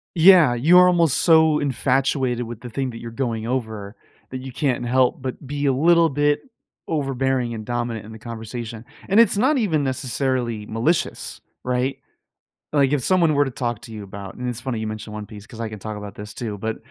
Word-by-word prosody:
Yeah, 170 -5 +7
you're 175 +9 +6
almost 170 -5 +3
so 160 -2 +5
infatuated 130 -2 0
with 115 0 -8
the 125 - -7
thing 130 +2 -2
that 115 - -9
you're 115 - -7
going 115 -3 -2
over 110 -5 -3 0.4
that 130 0 -5
you 130 0 -7
can't 125 -2 -1
help 130 +1 +2
but 130 +2 -5
be 145 +1 -3
a 135 - +3
little 165 +4 +4
bit 145 +1 +1 0.5
overbearing 135 -5 -1
and 110 -1 -6
dominant 120 -2 -3
in 110 - -11
the 110 - -10
conversation, 115 0 -7 0.3
and 200 +3 +5
it's 225 -3 +5
not 265 +7 +3
even, 170 - +1
necessarily, 130 -4 -1
malicious, 115 +11 -1 0.2
right? 125 +1 -1 0.7
Like, 140 -2 +3
if 140 -4 +1
someone 170 -2 +3
were 145 0 +3
to 135 - -4
talk 120 -3 -3
to 115 - -10
you 105 -2 -7
about 100 0 -9
and 125 - -5
it's 115 -2 -5
funny 120 -2 -3
you 110 - -3
mentioned 110 0 -6
One 105 0 -6
Piece 105 0 -12
'cause 115 - -12
I 115 - -3
can 110 -1 -8
talk 110 +1 -6
about 105 -1 -8
this, 105 +1 -8
too, 110 -4 -5
but 110 +2 -3
125 Hz, 205 wpm, -22 LUFS, 110-145 Hz, 0.7 s, Yeah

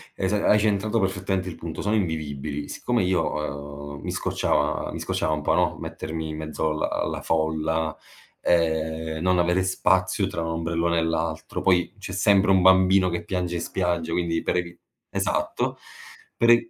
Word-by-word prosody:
esa 100 +2 0
hai 105 - +6
centrato 105 +1 +1
perfettamente 95 -1 -1
il 80 - -7
punto, 80 -2 -6
sono 105 +2 +1
invivibili. 75 -6 -2
Siccome 120 -4 0
io, 90 0 +1 0.7
uhm, - - -12
mi - - -5
scocciava - - 0
mi - - -5
scocciava 80 - -1
un 75 - -2
po', - - +1
no, - - +2
mettermi 80 0 -5
in 75 - -5
mezzo 80 0 -2
alla 75 - -1
alla - - -2
folla, 80 0 0 0.4
ehm, 80 -1 0
non 90 +1 +3
avere 90 +2 +2
spazio 95 +1 +2
tra 95 -4 -4
un - - -2
ombrellone 85 +1 0
e 80 - +1
l'altro, 80 -1 -2
poi 90 0 +2
c'è 95 -1 -6
sempre 100 0 +4
un 95 - +5
bambino 95 0 +5
che 85 0 -3
piange 90 -2 -2
in 85 - -2
spiaggia, 85 -2 -1
quindi 85 -2 0
per - - -1
evi 85 -1 -3 0.3
esatto, - - -1 0.6
per 115 - +3
e 115 -1 +4
85 Hz, 175 wpm, -25 LUFS, 80-95 Hz, 0.7 s, hai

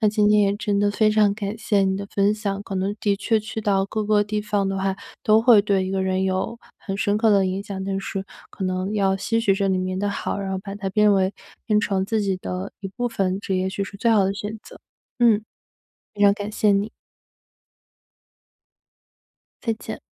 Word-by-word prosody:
那 215 - +4
今 210 0 +2
天 210 0 +5
也 200 0 +2
真 205 -1 -1
的 205 0 +3
非 215 +1 +2
常 210 -2 +3
感 205 +1 -4
谢 210 -2 +1
你 190 0 +1
的 200 0 -5
分 200 +1 +3
享， 200 -2 -3
可 195 - -5
能 195 +2 -1
的 200 -1 +1
确 220 +2 +1
去 215 +1 -5
到 200 -3 +1
各 215 +1 -3
个 210 0 +3
地 210 +1 -2
方 205 -2 -1
的 195 0 -2
话， 190 0 0 0.3
都 215 +1 +5
会 230 -3 +7
对 200 -2 +1
一 185 - -3
个 195 0 -1
人 190 0 0
有 190 +4 -1 0.2
很 195 -2 -5
深 205 +1 +1
刻 225 0 +3
的 200 -2 +4
影 190 +2 -2
响。 200 - -7
但 195 0 -2
是 195 0 -4 0.3
可 - - -8
能 185 +2 -2
要 195 -2 +2
吸 225 +4 0
取 205 -3 +3
这 195 0 0
里 190 -1 +1
面 185 0 -2
的 205 +1 0
好， 200 - -3
然 195 -1 -4
后 190 - -2
把 195 +1 -7
它 195 -1 -3
变 210 +1 +4
为 190 0 +2 0.3
变 210 -2 +3
成 195 -2 0
自 220 +2 0
己 195 -2 0
的 185 +1 -5
一 195 - -5
部 245 +5 -3
分， 195 -4 -1
这 195 - -2
也 185 0 0
许 195 +1 -3
是 200 - -10
最 230 +4 +1
好 210 -3 +4
的 195 - +1
选 210 +2 -6
择。 - - -13 0.4
嗯。 230 -3 +4 0.7
非 205 - -2
常 200 -1 +7
感 205 +1 -5
谢 210 0 +2
你。 200 +2 0 2.7
再 230 - 0
见。 220 - -8
200 Hz, 245 characters per minute, -23 LUFS, 195-210 Hz, 2.7 s, 会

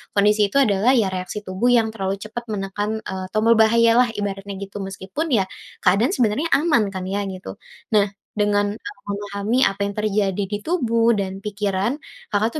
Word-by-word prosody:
kondisi 210 +1 +4
itu 280 - +5
adalah 215 +1 +3
ya 220 -6 +3
reaksi 185 +3 -4
tubuh 190 +5 -1
yang 225 -2 +3
terlalu 195 -3 -2
cepat 225 +3 -6
menekan, 205 +2 -3
eee, 190 0 -5
tombol 225 +1 +4
bahaya 230 +1 +5
lah 250 - +5
ibaratnya 200 -1 -4
gitu 200 +1 -7
meskipun 195 - -4
ya 200 -5 +4 0.4
keadaan 205 - +3
sebenarnya 245 +5 +1
aman 295 -9 +3
kan 185 - -4
ya 200 +1 -1
gitu. 190 +1 -7 0.3
Nah 210 -1 +4 0.3
dengan 205 -1 +1
Kakak 410 - -11
memahami 205 +3 -2
apa 195 - -1
yang 200 - -3
terjadi 205 -2 0
di 205 - -1
tubuh 235 -9 +2
dan 190 -1 -3
pikiran, 205 +3 -1 0.4
Kakak 220 +7 +1
210 Hz, 170 wpm, -22 LUFS, 195-230 Hz, 0.4 s, itu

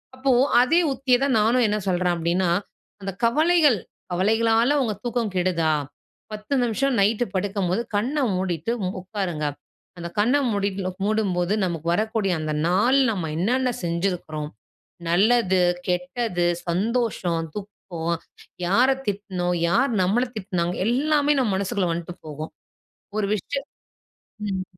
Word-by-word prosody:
அப்போ 265 +1 +1 0.3
அதே 305 +8 +4
உத்திய 255 -1 +2
தான் 275 -3 +2
நானும் 235 +3 +3
என்ன 210 0 0
சொல்றேன் 180 -1 +1
அப்டின்னா, 170 +2 0 0.5
அந்த 195 0 -3
கவலைகள், 305 - +4 0.3
கவலைகளால 225 +7 +3
உங்க 220 -4 -1
தூக்கம் 235 -4 -1
கெடுதா? 175 -3 +1 0.6
10 215 +4 -5
நிமிஷம் 250 +3 0
நைட்டு 215 +4 +2
படுக்கும்போது 195 +1 0
கண்ண 245 +9 0 0.2
மூடிட்டு 180 +1 -2 0.3
உட்காருங்க. 180 -5 -3 0.5
அந்த 170 - -4
கண்ண 235 +6 +3 0.2
மூடிட்டு 200 -1 -1
லோ 185 - -1
மூடும்போது 200 -4 +1
நமக்கு 165 -2 -4
வரக்கூடிய 215 -1 0
அந்த 155 -1 -2
நாள் 215 +10 +3
நம்ம 180 -7 -3
என்னென்ன 250 +7 +1
செஞ்சுருக்றோம், 170 -3 -2 0.6
நல்லது, 190 +1 +3 0.3
கெட்டது, 180 +1 -1 0.2
சந்தோஷம், 185 -3 0
துக்கம், 210 0 -6 0.9
யார 240 +8 +4 0.2
திட்டினோம், 190 -3 -2
யார் 260 +9 +2
நம்மள 210 +7 +2
திட்டினாங்க. 180 -4 -2
எல்லாமே 295 +4 +2
நம்ம 230 -7 +1
மனசுக்குள்ள 190 -1 -1
வந்துட்டு 170 +1 -4
போகும். 155 +1 -6 0.7
ஒரு 210 -2 0
விஷயம் 275 +8 -4 0.8
ம். 190 -2 -2
200 Hz, 120 wpm, -24 LUFS, 180-240 Hz, 0.9 s, அதே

